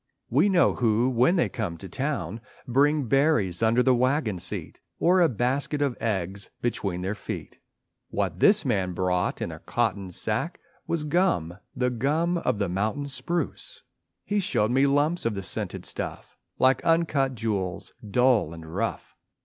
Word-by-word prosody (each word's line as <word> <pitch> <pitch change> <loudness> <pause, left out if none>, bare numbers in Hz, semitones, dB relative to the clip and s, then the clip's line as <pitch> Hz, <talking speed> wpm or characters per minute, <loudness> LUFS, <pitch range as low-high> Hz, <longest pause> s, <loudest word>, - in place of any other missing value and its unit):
We 205 - +4
know 180 -3 +4
who 120 +1 +2
when 130 +9 +3
they 170 - +2
come 100 -8 -4
to 95 - -9
town 125 - -3 0.3
Bring 145 +3 +3
berries 125 - +2
under 115 +2 +3
the 130 - +4
wagon 125 - +1
seat, 85 0 -2 0.2
Or 180 +2 +4
a 170 - +5
basket 130 +5 -1
of 140 -4 0
eggs 100 -3 -2
between 95 -7 -2
their 95 +2 -1
feet; 100 - -7 0.5
What - - -2
this - - +5
man 90 -2 0
brought 90 0 0
in - - -4
a - - -9
cotton 100 -5 -1
sack - - -2 0.3
Was 165 -2 -1
gum, 145 - 0 0.2
the 125 0 0
gum 155 +8 0
of 110 - 0
the 100 -1 0
mountain 110 +10 -2
spruce. 170 - -3 0.4
He 205 0 0
showed 110 - +1
me 135 +2 +4
lumps 145 +5 +2
of 115 -2 -1
the 95 - -4
scented - - -2
stuff - - -4 0.2
Like 130 0 +3
uncut 155 -6 +2
jewels, 100 -5 -3 0.2
dull 125 -7 +3
and 80 -1 -10
rough. - - -3
125 Hz, 160 wpm, -26 LUFS, 100-145 Hz, 0.5 s, a